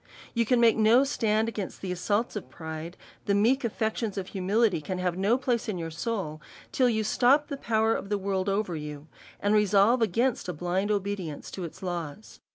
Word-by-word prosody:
You 230 -2 +1
can 250 0 +3
make 230 -2 +5
no 225 +4 +5
stand 220 -5 +1
against 205 -4 -5
the 190 - -4
assaults 205 +6 -1
of 210 - -6
pride, 160 +1 -7 0.3
the 200 - +2
meek 235 +7 +3
aflections 220 -2 -2
of 190 -1 -4
humility 195 -1 +1
can 185 +5 -4
have 180 -1 -1
no 200 +6 +2
place 245 -4 -1
in 200 - -2
your 165 -1 -4
soul, 165 -3 -3 0.3
till 255 -2 +3
you 220 -2 0
stop 265 +7 +3
the 280 - -3
power 225 -4 +1
of 195 - -4
the 205 - +1
world 195 0 -1
over 195 -3 -1
you, 150 -1 -7 0.3
and 205 +1 +1
resolve 210 +3 +4
against 225 +1 +1
a - - -2
blind 180 +5 -1
obedience 200 -7 -3
to 185 - -5
its 165 - -10
laws. 175 +1 -5
205 Hz, 195 wpm, -27 LUFS, 180-225 Hz, 0.3 s, make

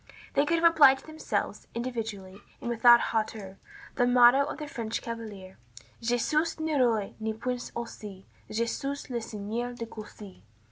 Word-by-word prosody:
They 285 +1 +2
could 335 - +2
have 335 0 +6
applied 280 -5 +7
to 270 - -16
themselves, 315 0 -3
individually, 220 -6 -5 0.2
and 240 - -4
without 240 +1 +7
hauteur, 215 -3 -3 0.4
the 245 -2 +3
motto 245 +2 +6
of 290 - -5
the 305 - -5
French 230 -5 -4
chevalier: 210 -5 -8 0.4
"Je 240 +1 +1
suis 310 +6 0
ni 315 0 -1
roi, 235 -7 +2
ni 220 0 -2
prince 245 +2 -4
aussi, 210 -5 -7 0.2
Je 225 +2 0
suis 275 +4 -4
le 240 -1 -2
seigneur 220 +3 -4
de 230 - -5
Coucy." 210 - -11
235 Hz, 160 wpm, -28 LUFS, 215-265 Hz, 0.4 s, applied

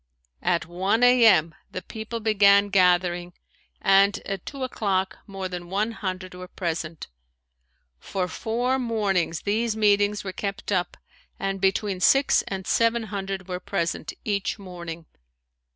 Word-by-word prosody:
At 170 - +1
one 190 +7 0
a. 245 -2 +7
m. 160 -6 +4 0.2
the 185 - -6
people 220 +1 -6
began 205 -2 +4
gathering 180 -2 +2 0.5
and 195 +1 +4
at 195 -2 -5
two 275 -2 -5
o'clock 190 -6 -1
more 195 -2 -5
than 175 -1 -7
one 210 +4 0
hundred 185 -4 -5
were 180 0 -9
present. 165 -3 -4 0.9
For 185 - -3
four 245 +7 -1
mornings 200 -9 0
these 220 +2 0
meetings 205 -1 +2
were 190 -2 -5
kept 200 +1 -4
up 180 -3 -1 0.4
and 195 -1 -2
between 195 0 +1
six 270 +8 +4
and 190 -1 -4
seven 230 +2 +2
hundred 195 -1 -4
were 180 -1 -4
present 170 -3 -2
each 200 0 -1
morning. 170 -4 -8
195 Hz, 135 wpm, -25 LUFS, 180-215 Hz, 0.9 s, a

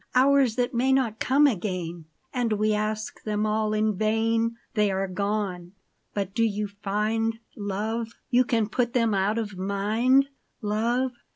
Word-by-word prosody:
Hours 265 -2 +4
that 250 +1 0
may 250 +3 +2
not 245 -5 +1
come 280 +3 +4
again, 180 - -1 0.3
And 240 -3 0
we 215 +1 +1
ask 215 0 -2
them 210 0 -1
all 215 0 0
in 215 0 +1
vain! 225 +2 +1 0.2
They 210 -2 +2
are 195 0 -1
gone; 190 -2 -2 0.4
but 195 -2 -2
do 230 - +1
you 210 -1 0
find, 220 +3 0 0.2
love. 220 +3 -3 0.2
You 250 +1 +5
can 230 -4 +1
put 240 +2 -1
them 230 -3 +2
out 200 +3 +1
of 205 -5 -4
mind, 220 +8 +2 0.3
love 235 +5 0
215 Hz, 155 wpm, -26 LUFS, 205-235 Hz, 0.4 s, You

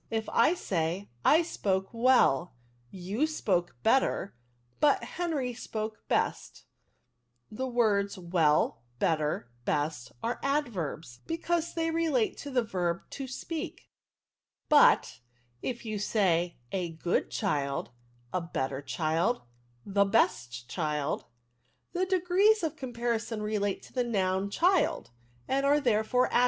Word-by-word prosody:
If 220 -1 -2
I 300 +9 +4
say, 175 - -2
* 120 - -36
I 340 - +2
spoke 190 - -1
weU, 230 - +4 0.4
you 195 - -1
spoke 185 - 0
better, 225 -4 +2 0.5
but 295 -2 +4
Henry 305 -8 -2
spoke 215 -1 -5
best,' - - -1 0.9
the 260 +5 -3
words 210 -5 +1
well, 165 -8 +2 0.2
better, 150 -5 0
best, 145 -2 -1
axe 235 +1 -1
adverbs, 180 - -2
because 335 0 -1
they 330 -1 0
relate 320 -8 +1
to 285 - -6
the 255 -3 +1
verb 175 -4 -2
to 270 -1 -5
speak; 315 +5 -6 0.8
but 295 - +5 0.4
if 240 -2 -4
you 215 -2 -3
say, 180 -5 +1
' - - -37
A 180 -3 -1
good 170 +2 0
child, 140 - -1 0.4
a 185 - 0
better 135 -5 -3
child, 165 - 0 0.4
the 200 0 +3
best 125 - +1
child,' 150 +1 -2 0.7
the 370 +1 0
degrees 375 +3 +3
of 320 -1 -1
comparison 235 -5 -2
relate 205 -2 -1
to - - -15
the 250 - +1
noun 195 -4 0
child, 350 - +2 0.4
and 275 +1 +1
are, 285 +1 +4
therefore, 245 -1 +2
adjectives." - - +5
215 Hz, 125 wpm, -29 LUFS, 170-270 Hz, 0.9 s, but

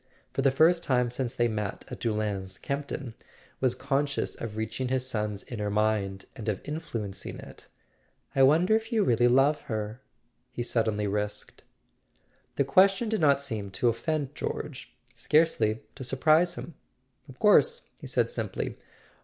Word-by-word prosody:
For - - 0
the 135 - +5
first 165 +5 +4
time 125 -4 +1
since 125 0 -3
they 120 - +1
had 120 - +2
met 105 -2 -3
at - - -6
Doullens 105 -4 -2
Campton 140 -3 -4 0.5
was 130 -2 +2
conscious 140 +2 -1
of 110 -2 -7
reaching 110 +4 -2
his 130 0 0
son's 105 -5 -2
inner 105 -4 -4
mind, 105 -2 0
and 115 -4 -4
of 100 - -3
in¬ 150 +2 -4
fluencing 105 -10 -5
it. - - -12 0.7
"I 135 - +4
wonder 160 +10 +5
if 225 +2 -2
you 220 -3 +3
really 120 - +3
love 135 +4 +4
her?" 110 +2 -3 0.5
he 120 -1 -3
suddenly 110 -3 0
risked. 105 +1 -3 0.9
The - - +2
question 195 - +4
did 220 -4 0
not 140 -2 +4
seem 110 -8 -4
to 110 +5 +1
offend 145 +3 -2
George, - - -5 0.2
scarcely 115 -9 +2
to 135 - -8
surprise 155 +7 +3
him. 170 - -8 0.6
"Of 130 - -12
course," 470 - +4 0.2
he - - -8
said - - +1
simply. - - -4
125 Hz, 160 wpm, -28 LUFS, 110-150 Hz, 0.9 s, the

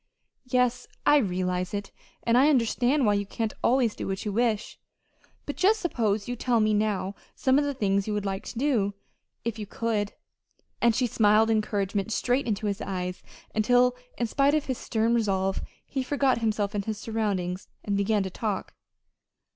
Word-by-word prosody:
"Yes, 250 -1 +1 0.2
I 295 - +6
realize 185 -4 -1
it, 200 0 -5 0.3
and 230 - +2
I 270 +4 +6
understand 255 +1 +2
why 210 - +4
you 200 -1 -1
can't 225 +1 -2
always 245 -3 +3
do - - -5
what 195 +2 -3
you 210 - -1
wish. 225 -1 0 0.7
But 290 - -5
just 420 +4 +4
suppose 220 - 0
you 245 - -2
tell 240 0 +1
me 215 0 +3
now 205 -2 0 0.2
some 260 +1 +3
of 290 - +1
the 285 -1 -2
things 200 -4 +1
you 215 - -1
would 205 -1 -2
like 195 +1 -2
to - - -7
do 230 -7 +1 0.5
if 230 -1 -2
you 210 - -5
could." 210 -2 -1 0.7
And 235 -1 +4
she 255 - +2
smiled 220 -1 +4
encouragement 205 -1 0
straight 245 +3 +1
into 215 -1 -1
his 205 0 -1
eyes 180 -1 -4 0.3
until 245 +3 +3 0.2
in 240 - 0
spite 280 +5 +2
of 305 - 0
his 260 -2 -3
stern 225 +1 0
resolve 195 -4 +1 0.2
he 270 - -3
forgot 265 -1 +1
himself 215 -2 0
and 200 -1 -2
his 220 -1 -3
surroundings, 200 -5 -2 0.2
and 205 - -1
began 200 +1 +2
to 190 - -5
talk. 205 0 -3
220 Hz, 180 wpm, -27 LUFS, 200-245 Hz, 0.7 s, I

